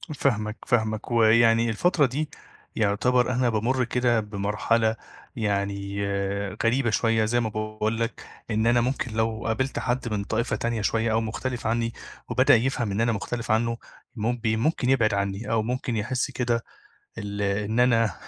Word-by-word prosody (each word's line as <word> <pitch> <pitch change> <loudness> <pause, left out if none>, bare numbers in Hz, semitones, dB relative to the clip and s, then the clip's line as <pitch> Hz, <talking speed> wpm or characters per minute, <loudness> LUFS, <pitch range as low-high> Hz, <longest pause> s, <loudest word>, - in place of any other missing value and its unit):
فاهمك، 110 -5 0
فاهمك 110 -1 0
ويعني 115 0 +4
الفترة 150 - +2
دي 145 +4 -2 0.5
يُعتبر 125 +4 +2
أنا 125 0 +2
بامُرّ 120 +4 +1
كده 120 -1 +1
بمرحلة 105 +2 0 0.4
يعني 100 -2 -2 0.6
غريبة 120 +2 +2
شوية 110 0 +2
زي 120 +2 +1
ما 115 -2 -1
باقول 110 +1 -2
لك، 115 +1 -3 0.3
إن 110 +1 +1
أنا 120 0 +4
ممكن 130 -1 -1
لو 110 0 -1
قابلت 130 +5 -1
حد 125 -1 -1
من 100 -1 -1
طائفة 115 +3 -1
تانية 115 -2 -2
شوية 115 +2 +1
أو 110 +1 +2
مختلف 120 +2 -3
عنّي 115 0 0 0.4
وبدأ - - +5
يفهم 120 -3 0
إن 105 +3 0
أنا 115 0 +2
مختلف 115 +2 -3
عنّه 115 +1 +1 0.4
مب 115 +1 -2
ممكن 125 +4 +1
يبعد 115 -6 +3
عنّي 100 +2 -2
أو 115 -1 +2
ممكن 125 0 -2
يحس 125 +6 -1
كده 120 -2 -1 0.6
ال 100 -1 -4
إن 105 +3 0
أنا 115 -3 +3
115 Hz, 155 wpm, -25 LUFS, 110-120 Hz, 0.6 s, وبدأ